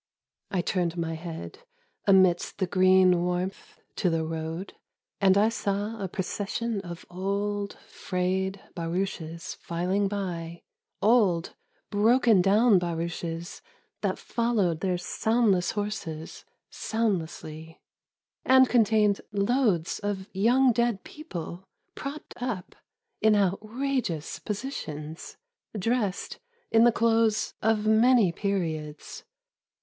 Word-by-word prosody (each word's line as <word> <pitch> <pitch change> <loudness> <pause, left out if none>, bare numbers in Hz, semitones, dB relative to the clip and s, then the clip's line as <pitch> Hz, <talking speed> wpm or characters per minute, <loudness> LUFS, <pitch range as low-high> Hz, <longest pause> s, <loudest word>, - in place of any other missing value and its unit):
I 185 -3 0
turned 175 -1 -1
my 165 -1 -2
head, 165 - -7 0.5
amidst 185 -3 +4
the 190 - +1
green 185 -1 +4
warmth, 180 +2 -3 0.2
to 180 - +2
the 165 -1 0
road. 160 +3 -5 0.5
And 195 -1 +5
I 210 +2 +4
saw 205 0 -2
a 195 - -1
procession 205 +4 -3
of 175 -2 -9
old, 200 +2 -2
frayed 190 +1 -2
barouches 170 -1 -3
filing 185 +4 -1
by; 170 -4 -4 0.4
Old, 200 -7 +3 0.4
broken 220 0 +4
down 205 +2 +5
barouches 170 0 -4 0.4
that - - 0
followed 215 -9 0
their 185 0 0
soundless 200 0 +1
horses 205 -7 -5 0.3
soundlessly, 165 -7 -3 0.6
And 260 0 +6
contained 215 -4 +3
loads 200 -4 +1
of 200 -2 -3
young 245 +7 +4
dead 235 -4 0
people, 185 - -7 0.3
propped 285 +2 -7
up 230 -8 -4 0.5
in 220 -1 +5
outrageous 210 - -1
positions; 165 - -6 0.4
Dressed 210 -1 -1 0.3
in 225 +1 +6
the 240 - +6
clothes 225 -2 +2
of 215 -1 +2
many 220 -2 +5
periods. 160 -6 -3
195 Hz, 105 wpm, -27 LUFS, 175-220 Hz, 0.6 s, And